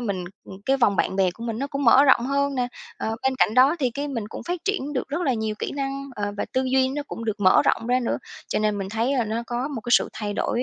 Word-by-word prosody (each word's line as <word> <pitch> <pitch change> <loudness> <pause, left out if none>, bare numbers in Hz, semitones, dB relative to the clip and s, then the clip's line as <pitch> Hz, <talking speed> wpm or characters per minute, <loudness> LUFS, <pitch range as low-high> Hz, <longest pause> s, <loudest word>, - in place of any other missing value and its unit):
mình 200 -6 -2 0.2
ừm, 190 - -10
cái 270 - +3
vòng 225 -7 +3
bạn 190 - 0
bè 190 -2 +3
của 230 +6 -9
mình 225 -1 -3
nó 275 - -1
cũng 280 -1 -3
mở 260 +4 +7
rộng 255 -3 +4
hơn 280 +1 0
nè, 250 -2 0 0.3
ờ, 225 0 -3
bên 265 0 +1
cạnh 215 - +3
đó 265 +6 +5
thì 255 -4 +1
cái 285 +4 -4
mình 230 -6 -4
cũng - - -7
phát 355 - -1
triển 370 -8 -1
được 255 - -2
rất 295 +6 -2
là 265 -7 +1
nhiều 220 -1 -2
kỹ - - -3
năng, 275 0 -4
ờ, 205 0 -2
và - - -1
tư 260 - +1
duy 260 0 +4
nó 290 +2 -3
cũng 230 - -6
được 215 -2 -3
mở 185 -2 +5
rộng 230 - +1
ra 250 +1 +2
nữa, 240 - -1 0.3
cho - - 0
nên 210 -1 0
mình 195 -1 -4
thấy 230 +6 0
là 240 - +2
nó 225 +2 -2
có 245 +3 -2
một 270 -7 -5
cái 240 - -6
sự - - +5
thay 210 -1 -4
đổi, 240 +4 -1
245 Hz, 300 wpm, -24 LUFS, 220-275 Hz, 0.3 s, mở